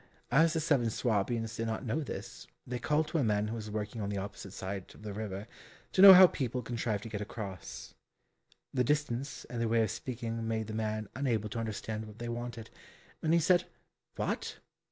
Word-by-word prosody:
As 160 +5 +5
the 165 - +1
seven 145 -7 +2
Swabians 115 0 0
did 115 - -2
not 110 +4 -3
know 125 +7 0
this, 145 - -7 0.2
they 125 0 -4
called 150 +4 +1
to 165 - 0
a - - +2
man 105 -2 +1
who - - -3
was 110 -2 -6
working 105 +1 -4
on 100 - -2
the 100 - -2
opposite 100 0 -6
side 95 0 -5
of - - -15
the 105 -1 -5
river, 100 -1 -4 0.5
to 185 - +3
know 195 -1 +13
how 185 +1 +11
people 125 -7 -1
contrived 115 -3 -2
to 115 - -7
get 105 -2 -4
across. 100 -3 -7 0.8
The 125 - +2
distance 140 -1 -1
and 120 -1 -4
their 115 - +1
way 115 0 +4
of 110 - -1
speaking 115 -1 -4
made 110 -1 -1
the 110 - -6
man 110 -1 -2
unable 115 -6 0
to 115 - -4
understand 110 0 -4
what 105 0 -12
they 120 0 -5
wanted, 120 -1 -5 0.5
and 160 - +1
he 170 - +5
said 180 +2 +4 0.5
"What? - - -2
115 Hz, 205 wpm, -32 LUFS, 110-130 Hz, 0.8 s, know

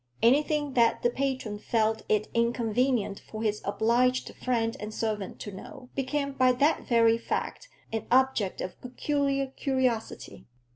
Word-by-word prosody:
Anything 290 +3 +3
that 235 -3 +3
the 240 - +3
patron 260 -6 -2
felt 220 0 0
it 215 0 +2
inconvenient 235 -2 +1
for 220 0 -7
his 210 -1 0
obliged 240 +5 +1
friend 230 -3 0
and 210 +1 -5
servant 215 -3 -3
to 205 - -6
know, 200 +6 -11
became 280 +1 -1
by 255 -2 +3
that 285 +6 +1
very 230 -1 +4
fact - - -4 0.2
an 225 - -3
object 255 -6 +2
of 185 - -6
peculiar 275 +2 -1
curiosity. 255 - -2
240 Hz, 140 wpm, -28 LUFS, 220-265 Hz, 0.2 s, very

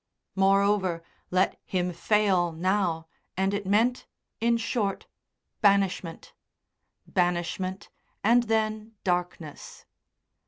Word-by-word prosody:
Moreover, 195 -3 +2 0.3
let 185 +1 +1
him 180 -1 -2
fail 190 -2 +2
now, 175 -1 0 0.3
and 190 +1 +1
it 200 -1 -3
meant, 230 +5 +2 0.3
in 235 0 +2
short, 220 -3 -2 0.6
banishment 195 -4 +1 0.7
banishment 180 +1 -1 0.3
and 235 +4 +5
then 220 -1 -1
darkness. 175 -4 -3
195 Hz, 85 wpm, -27 LUFS, 180-210 Hz, 0.7 s, and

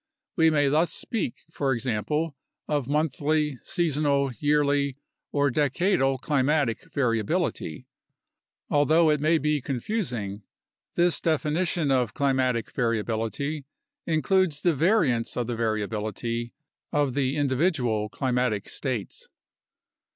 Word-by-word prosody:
We 160 -1 +5
may 145 -2 +3
thus 155 +5 +2
speak, 220 - -3
for 140 -4 0
example, 135 +6 -1 0.3
of 145 -4 -1
monthly, 150 -1 0
seasonal, 145 -4 +1
yearly, 145 -2 +2 0.3
or 145 -1 +2
decadal 140 0 +2
climatic 140 -3 0
variability. 115 - -1 0.8
Although 155 +2 +4
it 150 - +1
may 160 +2 +4
be 150 -1 0
confusing, 120 - -3 0.5
this 175 0 +2
definition 160 0 0
of 125 -4 +1
climatic 130 -4 +1
variability 115 +5 -2 0.4
includes 165 -1 +2
the 175 - +3
variance 150 - +2
of 120 - 0
the 120 +1 -3
variability 115 +1 -2 0.4
of 145 -3 +1
the 135 +1 0
individual 130 - +1
climatic 125 -3 -1
states. 125 -7 -4
140 Hz, 105 wpm, -26 LUFS, 120-155 Hz, 0.8 s, We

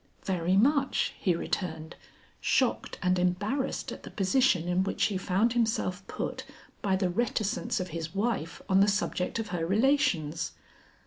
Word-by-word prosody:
"Very 185 0 +1
much," 275 +5 +2
he 180 -3 +2
returned, 160 -2 -3 0.4
shocked 255 -3 +1
and 180 0 +2
embarrassed 205 +10 -1
at - - -8
the - - -9
position 195 -3 +2
in 180 +1 +2
which 195 - -1
he 205 - +2
found 200 +5 +1
himself 220 -5 0
put - - -4 0.4
by 195 -2 +1
the 185 -2 0
reticence 225 +2 -1
of 185 0 -3
his 165 +2 -5
wife 200 -6 -2
on 190 -1 +4
the 200 - +5
subject 200 -2 0
of 225 -1 -3
her 175 -3 -2
relations. 175 - +1
195 Hz, 150 wpm, -29 LUFS, 180-225 Hz, 0.4 s, the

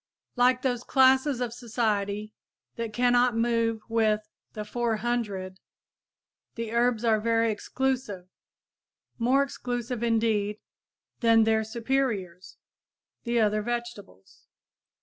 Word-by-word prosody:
Like 250 0 +3
those 245 -2 -1
classes 265 0 +3
of 240 -2 -2
society 215 -3 -2 0.4
that 230 -1 -4
cannot 245 0 +3
move 230 -1 +1
with 215 -2 +1 0.3
"the 210 -1 -5
four 235 +1 -1
hundred," 210 -5 -3 1.0
the 230 -1 -4
herbs 235 -1 +1
are 220 -2 +3
very 230 0 +2
exclusive, 240 -4 -2 0.9
more 260 +4 +3
exclusive 245 -3 -4
indeed, 220 -3 +1 0.6
than 230 -1 +5
their 220 0 +2
superiors, 220 -6 -2 0.7
the 235 0 +1
other 215 -1 +2
vegetables. 235 - -7
230 Hz, 105 wpm, -27 LUFS, 215-245 Hz, 1.0 s, than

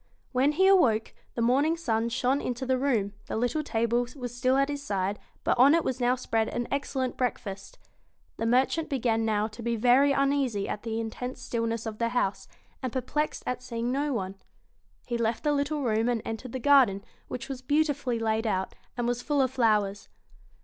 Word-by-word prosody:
When 270 +3 +2
he 380 +5 +3
awoke, 250 - +4 0.2
the 235 - 0
morning 280 +7 +3
sun 230 -7 0
shone 255 +4 +1
into 250 +1 -3
the 260 0 +1
room, 225 -8 +1
the - - -3
little 245 +7 0
table 235 -2 0
was 245 -3 -6
still 255 +2 +2
at 275 0 +3
his 285 -1 -4
side, 200 -5 -2 0.2
but - - +2
on 275 +5 +7
it 335 - +2
was 260 0 -2
now 245 0 +3
spread 225 -3 -1
an 240 0 -3
excellent 270 -2 -2
breakfast 210 -6 -3 0.6
The 225 - -1
merchant 265 +7 +2
began 230 -4 +1
now 215 -1 +1
to 225 +2 -10
be 235 0 -1
very 250 +5 +4
uneasy 275 -7 +1
at 210 - -4
the 225 -1 -3
intense 250 +3 -5
stilness 230 -2 -2
of 220 -1 -5
the 230 0 +1
house, 230 -5 -1 0.3
and 255 -3 -3
perplexed 270 +5 -2
at 250 0 -2
seeing 240 -1 -3
no 285 +2 0
one. 195 -5 -3 0.7
He 235 -1 -2
left 230 0 0
the 295 -1 +2
little 285 +1 -1
room 225 0 +1
and 230 -3 -1
entered 225 +2 -5
the - - -1
garden, 250 -7 +4 0.2
which 250 - -6
was 270 -2 -6
beautifully 285 -3 +1
laid 225 0 0
out, 190 -2 -1 0.2
and 240 -1 0
was 245 0 -1
full 290 +1 0
of 260 -2 +2
flowers. 210 -5 +1
245 Hz, 195 wpm, -28 LUFS, 225-275 Hz, 0.7 s, on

